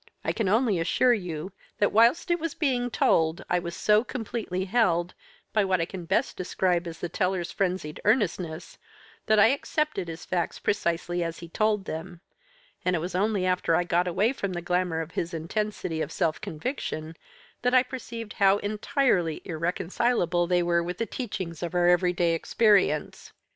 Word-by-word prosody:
I - - +1
can 215 -5 -1
only 220 -3 +2
assure 240 +9 +3
you 180 -4 -4 0.3
that 205 - +2
whilst 235 - +4
it 345 - +2
was 330 -1 -3
being 250 -5 0
told, 160 -7 +2
I 180 - +3
was 170 -1 -6
so 210 +1 +3
completely 220 -7 -4
held, 180 -5 +1 0.4
by 215 - +3
what 190 -2 +1
I 165 - +1
can 180 0 -8
best 195 +9 0
describe 180 -1 0
as 165 -1 -7
the 175 - -4
teller's 180 0 -1
frenzied 180 -5 -2
earnestness, 185 -7 0 0.5
that 215 0 +4
I 210 +2 +7
accepted 285 - -1
his 165 +1 -7
facts 175 -2 -1
precisely 175 -2 -1
as 165 0 -4
he 170 - -9
told 210 +1 +1
them, 165 +2 -6 0.6
and 180 0 +1
it - - 0
was 175 +3 -4
only 200 0 +1
after 180 -2 +2
I 175 - +2
got 175 +1 +1
away 210 +8 +1
from 200 -7 -3
the 175 - -3
glamour 180 -2 0
of 165 +1 -7
his 170 +1 -3
intensity 170 -1 -3
of 150 - -3
self 155 -1 -1
conviction 160 - -4 0.5
that 250 +1 +2
I 255 - +6
perceived 235 -4 -7
how 195 0 +4
entirely 205 - 0
irreconcilable 175 +2 0
they 175 0 +2
were 170 0 +2
with 175 +1 -4
the 230 - -1
teachings 185 - -5
of 175 0 -4
our 175 0 +3
everyday 175 -1 +3
experience. 195 -3 +1
180 Hz, 175 wpm, -27 LUFS, 170-215 Hz, 0.6 s, I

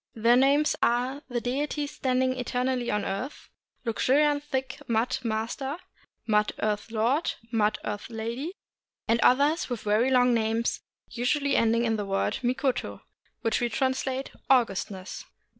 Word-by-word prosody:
Their 230 +2 +4
names 280 +4 +4
are 250 +4 +1
The 245 -1 -1
Deity 285 +5 -2
Standing 260 -2 0
Eter 250 0 -2
nally 255 -2 -1
on 210 0 0
Earth, 245 +9 -5 0.4
Luxuriant 290 +5 +2
Thick 265 -3 -3
Mud 230 +3 +1
Master, 235 +6 -2 0.5
Mud 210 -1 +2
Earth 210 +1 -1
Lord, 235 +8 +1 0.2
Mud 215 -2 +2
Earth 205 +2 -4
Lady, 235 +9 -4 0.5
and 230 +1 +3
others 285 +6 +3
with 245 -3 -3
very 215 +5 +2
long 250 -1 +4
names, 225 0 0 0.3
usually 280 +4 0
ending 230 +1 +3
in 225 -1 +1
the 205 - -3
word 195 0 0
mikoto, 255 +1 -1 0.4
which 225 0 0
we 240 - +1
translate 265 +2 -1 0.2
"augustness." 200 -6 0
245 Hz, 140 wpm, -27 LUFS, 225-265 Hz, 0.5 s, Their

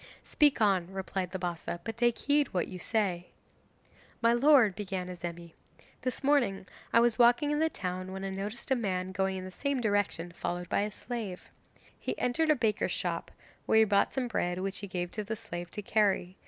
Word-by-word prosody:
'Speak 295 -4 +3
on,' 190 -5 +2
replied 190 -1 -3
the 190 - -4
Bassa, 175 -1 -4
'but 225 -1 -4
take 240 0 +2
heed 290 0 +2
what 180 - +1
you 185 - -8
say.' 185 -5 -1 0.9
'My 230 0 +4
lord,' 240 -6 +5
began 190 -2 -4
Azemi, 170 -1 -7 0.5
'this 255 +1 -3
morning 260 -10 +2 0.3
I - - +6
was 235 0 +3
walking 245 +5 +5
in 295 - +1
the 320 0 +3
town 185 - -4
when 190 0 -5
I 195 - -3
noticed 205 +7 -5
a - - +5
man 190 -5 -2
going 190 0 0
in 185 - -6
the 185 - -7
same 280 +6 -1
direction 205 -6 0
followed 175 +1 -4
by - - +2
a 210 - -1
slave. 210 -4 -6 0.5
He - - -3
entered 310 +6 +1
a 305 - +6
baker's 225 -5 0
shop, - - -2 0.4
where - - +4
he 220 - +8
bought 205 -2 +3
some 260 -2 -1
bread 180 -6 -1
which 195 +1 -3
he 200 - -6
gave 175 -2 -3
to 215 - -4
the 220 +2 -3
slave 175 -5 -7
to 210 - -6
carry. 195 -3 +1
200 Hz, 200 wpm, -30 LUFS, 185-240 Hz, 0.9 s, he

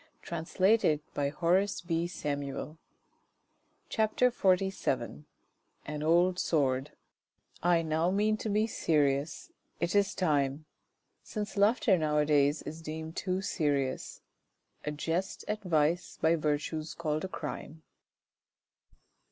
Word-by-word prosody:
she - - -11
said 185 +6 +2
to 150 -7 +2 0.2
herself 165 -2 -1 1.1
CHAPTER 220 +3 +2
XLVII 180 - 0 0.6
AN 150 0 -4
OLD 175 +3 +3
SWORD 135 -2 +1 0.7
I 170 -1 +3
now 160 +2 +1
mean 210 +3 +2
to 215 - -4
be 210 +1 +2
serious; 145 -7 0 0.3
it 170 +1 0
is 200 -1 +2
time 145 -4 +1 0.6
Since 210 -2 -5
laughter 205 -2 +4
now 150 -1 +1
a 150 - +3
diiys 145 0 +2
is 160 +2 -7
deemed 160 +1 -6
too 185 0 -1
serious. 145 -8 -1 0.6
A - - -1
jest 165 +6 -2
at 210 0 -2
vice 170 -1 +1
by 160 +1 +4
virtue 150 0 -1
s 155 +1 -7
called 155 -2 -2
a - - -1
crime. 160 -2 -7
160 Hz, 115 wpm, -30 LUFS, 150-185 Hz, 1.1 s, laughter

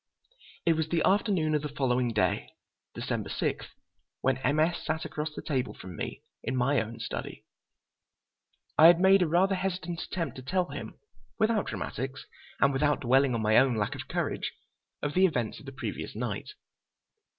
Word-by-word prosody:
It 165 - +5
was 160 -1 -1
the 165 -1 +1
afternoon 190 -6 +2
of 150 - +2
the 150 - -4
following 125 -3 +1
day, 105 -1 0 0.5
December - - -3
6, - - -2 0.5
when 130 0 +1
M. 145 +3 +1
S. 165 +2 +1
sat 160 0 -2
across 150 0 -4
the - - -6
table 130 -4 -1
from 90 -1 -9
me - - -5 0.2
in - - -2
my 130 +1 +2
own 115 +1 -7
study. 115 - -5 1.3
I 160 - +11
had 170 0 +7
made 190 +1 +6
a 175 - +3
rather 180 +5 +3
hesitant 180 -2 -2
attempt 165 -9 -4
to - - -6
tell 180 +7 0
him, - - -7 0.4
without 220 -2 +2
dramatics 135 +1 -4 0.3
and 140 0 +4
without 145 +2 +2
dwelling 130 0 +3
on 110 - -1
my 110 +1 +4
own 130 -2 +3
lack 105 -2 -1
of - - -7
courage, - - -2 0.5
of 145 - -1
the 190 +1 +5
events 125 -10 -2
of - - -14
the - - -5
previous 135 - -5
night. - - -3
150 Hz, 175 wpm, -29 LUFS, 130-175 Hz, 1.3 s, I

